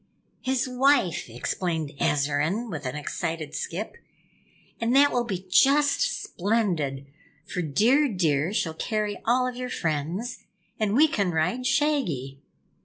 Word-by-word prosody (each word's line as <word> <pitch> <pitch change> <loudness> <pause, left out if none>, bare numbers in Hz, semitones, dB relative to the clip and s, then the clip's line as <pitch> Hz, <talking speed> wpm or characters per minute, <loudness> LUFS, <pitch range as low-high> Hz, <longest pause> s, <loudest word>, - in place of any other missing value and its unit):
"His 260 0 0
wife," 255 - +2
explained 160 +6 -2
Azarine 150 +11 0
with 150 -5 -4
an 130 - -4
excited 155 0 -4
skip. 195 +6 -4 0.8
"And 235 +2 +1
that 285 +1 +6
will 245 -1 0
be 190 -4 -4
just 285 - +3
splendid, 175 -10 -1 0.4
for 180 - -3
Dear 230 - +3
Deer 165 - +1
shall 165 -6 -1
carry 210 +3 -2
all 250 +2 +3
of 250 - -4
your 250 0 -4
friends, 170 - -2 0.4
and 215 -1 +1
we 305 +5 +6
can 205 - 0
ride 180 +10 0
Shaggy!" 260 - 0
200 Hz, 130 wpm, -26 LUFS, 155-250 Hz, 0.8 s, that